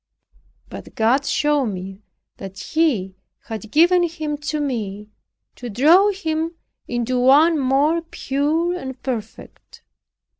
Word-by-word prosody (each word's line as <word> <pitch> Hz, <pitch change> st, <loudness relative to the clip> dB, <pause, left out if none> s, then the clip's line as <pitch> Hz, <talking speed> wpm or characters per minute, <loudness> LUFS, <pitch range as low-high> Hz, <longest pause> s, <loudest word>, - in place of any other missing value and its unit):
But -, -, -11 dB
God 255 Hz, +6 st, +2 dB
showed 295 Hz, -3 st, +1 dB
me, 190 Hz, 0 st, -6 dB, 0.4 s
that 195 Hz, -1 st, -9 dB
He 215 Hz, -, -1 dB, 0.3 s
had 220 Hz, -1 st, -7 dB
given 350 Hz, +7 st, +4 dB
him 315 Hz, -3 st, -2 dB
to 300 Hz, +1 st, -3 dB
me, 210 Hz, -7 st, -4 dB, 0.5 s
to 245 Hz, -, -7 dB
draw 320 Hz, -, +5 dB
him 330 Hz, -4 st, -3 dB, 0.3 s
into 245 Hz, +1 st, -1 dB
one 295 Hz, +6 st, +5 dB
more 280 Hz, +5 st, +2 dB
pure 320 Hz, +2 st, -1 dB
and 265 Hz, -6 st, -7 dB
perfect. 230 Hz, -5 st, -7 dB
275 Hz, 115 wpm, -21 LUFS, 225-320 Hz, 0.5 s, draw